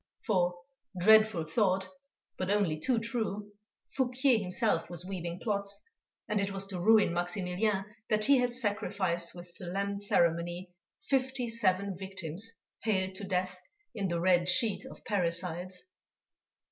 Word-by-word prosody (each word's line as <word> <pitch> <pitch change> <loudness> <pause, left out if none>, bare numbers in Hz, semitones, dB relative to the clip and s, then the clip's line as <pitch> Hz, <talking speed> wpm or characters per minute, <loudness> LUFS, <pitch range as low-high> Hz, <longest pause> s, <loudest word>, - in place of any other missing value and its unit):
_ - - -20
For, 180 -5 +2 0.4
dreadful 215 -2 +6
thought, 190 +2 +1 0.5
but 185 - -3
only 200 -7 +1
too 250 +8 +1
true! 220 -3 -3 0.3
Fouquier 255 -1 +2
himself 185 -2 0
was 175 0 -4
weaving 175 -2 -5
plots, 200 -3 -1 0.5
and 210 -1 +1
it 200 - 0
was 195 0 -2
to 195 -2 -4
ruin 215 -2 +5
Maximilien 180 +3 0 0.2
that 215 0 +3
he 275 -2 +6
had 245 -1 0
sacrificed 200 -7 -1
with 175 0 -9
solemn 200 +2 -2
ceremony 175 -1 +1 0.3
fifty 260 0 0
seven 200 -3 +1
victims 190 +2 -3 0.3
haled 190 -4 0
to 190 - -7
death 185 -1 -1 0.3
in 200 -4 -1
the 170 -1 -1
red 175 0 +3
sheet 225 +4 +1
of - - -12
parricides. 180 - -1
195 Hz, 135 wpm, -31 LUFS, 180-215 Hz, 0.5 s, dreadful